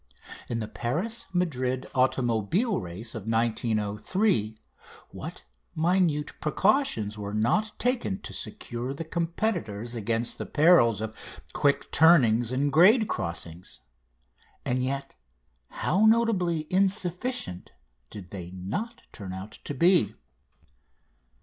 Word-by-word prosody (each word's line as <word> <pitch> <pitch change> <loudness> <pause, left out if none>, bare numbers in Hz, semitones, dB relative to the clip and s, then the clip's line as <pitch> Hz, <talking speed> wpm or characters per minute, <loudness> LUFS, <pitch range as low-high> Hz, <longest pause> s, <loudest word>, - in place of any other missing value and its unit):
In 120 - -1
the 110 -2 -3
Paris 175 - -3
Madrid 130 -8 -1
automobile 130 - +1
race 95 +5 -6
of 110 -3 -7
1903 110 - 0 0.5
what - - -8 0.3
minute 165 -3 +1
precautions 150 - +1
were 100 0 -4
not 210 - +1
taken 240 -6 0
to - - -8
secure 130 - -5
the 165 - -4
competitors 165 - -2
against 115 +1 -2
the - - -4
perils 145 - +5
of 110 0 -7
quick 140 0 +1
turnings 120 -8 +5
and 140 +2 0
grade 210 - +6
crossings? 85 -2 -5 0.8
And 125 +1 0
yet 135 +1 -3 0.6
how 210 +4 +2
notably 195 -9 +2
insufficient 190 - -1 0.4
did 90 -4 -10
they 90 -3 -7
not 210 - -5
turn 95 -4 -7
out 95 +3 -8
to 145 - -4
be. 170 - +3
130 Hz, 110 wpm, -27 LUFS, 110-185 Hz, 0.8 s, grade